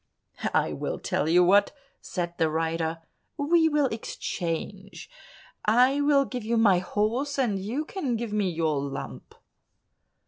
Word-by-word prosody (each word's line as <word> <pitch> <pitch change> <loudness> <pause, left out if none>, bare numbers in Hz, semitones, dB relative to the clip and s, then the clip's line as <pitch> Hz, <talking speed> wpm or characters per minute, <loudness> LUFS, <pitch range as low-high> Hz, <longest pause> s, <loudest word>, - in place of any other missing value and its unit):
"I - - +2
will - - -3
tell 155 - -1
you 175 +2 +5
what," 200 +3 +4 0.3
said 175 -2 -4
the 160 - +3
rider, 165 +1 -2 0.3
"we 320 +3 +3
will 295 -2 +2
exchange: 195 - -5 0.5
I 250 +6 +4
will 285 -1 +4
give 250 -3 -5
you 230 +2 0
my 200 -5 +5
horse, 230 +10 -1
and 225 -8 +1
you 235 +11 -3
can 290 -9 -3
give 225 -2 -4
me 205 -3 +1
your 160 -4 0
lump." 135 - -7
210 Hz, 140 wpm, -26 LUFS, 170-265 Hz, 0.5 s, you